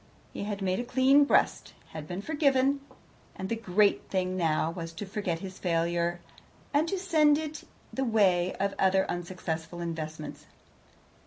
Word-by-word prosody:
He - - -4
had 205 -1 -4
made 185 0 0
a - - -1
clean 260 +3 +5
breast, - - +1
had 155 -1 -8
been 180 +3 -5
forgiven, 280 -2 +2 0.5
and 190 - -5
the 230 - 0
great 205 -2 +2
thing 185 -1 -1
now 160 -2 +1
was 165 -1 -6
to 180 +6 -6
forget 195 -4 -2
his 190 -1 -8
failure, 170 0 0 0.5
and 300 +3 +3
to 390 - -1
send 310 -6 +4
it 310 0 -5 0.3
the 270 - -1
way 190 -7 +2
of 200 +1 -1
other 190 0 +3
unsuccessful 175 -1 -4
investments. 160 -2 -6
190 Hz, 155 wpm, -29 LUFS, 175-260 Hz, 0.5 s, clean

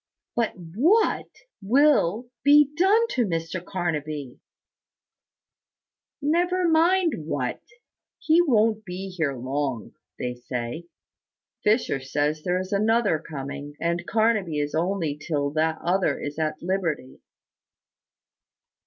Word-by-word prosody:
"But 235 -2 0
what 245 - +1 0.3
will 245 - +3
be 290 0 +6
done 405 +7 +4
to 250 - +1
Mr 165 -2 -3
Carnaby?" 155 -7 -4 1.8
"Never 350 +4 +2
mind 330 - +2
what: 130 -5 -2 0.6
he 325 +2 +4
won't 220 -8 +2
be 190 0 -6
here 160 -7 -2
long, 130 -1 -3 0.2
they 125 0 -3
say. 125 +6 -5 0.8
Fisher 210 - +2
says 145 +3 -1
there 180 +2 0
is 185 0 -6
another 215 -4 +2
coming; 140 -1 -7
and 170 +1 -1
Carnaby 215 -7 +1
is 145 0 -1
here 155 - 0
only 175 -5 -1
till 145 -2 -2
that 160 +1 0
other 175 -4 +1
is 145 +2 -5
at 155 -1 -1
liberty." 170 -8 -2
175 Hz, 110 wpm, -25 LUFS, 150-230 Hz, 1.8 s, be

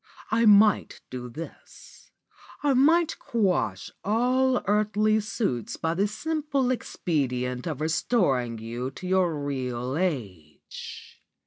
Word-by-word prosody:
I 225 +1 +3
might 210 -1 +5
do 125 -1 -6
this; 160 +8 -11 0.5
I 285 -2 +3
might 320 +6 +3
quash 180 - 0
all 250 +5 +2
these 250 - 0
earthly 215 +1 +2
suits 205 - -2
by 165 0 -1
the 195 +4 +1
simple 285 +2 -1
expedient 125 - -2
of 155 -3 -4
restoring 150 - +1
you 120 +3 -4
to 135 - -10
your 180 -3 +2
real 130 -2 -3
age. 105 - -5
180 Hz, 115 wpm, -26 LUFS, -, 0.5 s, might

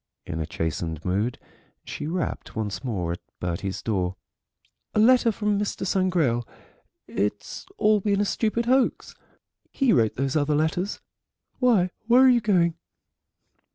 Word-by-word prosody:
In 80 - -4
a 80 - -3
chastened 80 -1 -3
mood 100 +7 0 0.5
she - - -5
rapped 175 +1 -3
once 110 +1 -3
more 95 -10 -2
at 85 - -4 0.2
Bertie's 90 +2 -3
door. 95 -4 -1 0.8
"A - - +3
letter 240 +1 +5
from 210 -1 0
Mr. 205 -1 -2
Sangrail. 175 -11 +1 0.6
It's 105 - -3
all 215 -1 +4
been 200 0 0
a 205 - +2
stupid 225 +3 0
hoax. 260 +1 +1 0.6
He 270 -4 +2
wrote 115 -4 +2
those 135 +2 -1
other 150 0 +2
letters. 165 +6 -1 0.6
Why, 220 -8 +3 0.2
where 245 +2 +6
are 260 - +7
you 245 -2 +4
going?" 175 -6 +2
170 Hz, 140 wpm, -25 LUFS, -, 0.8 s, are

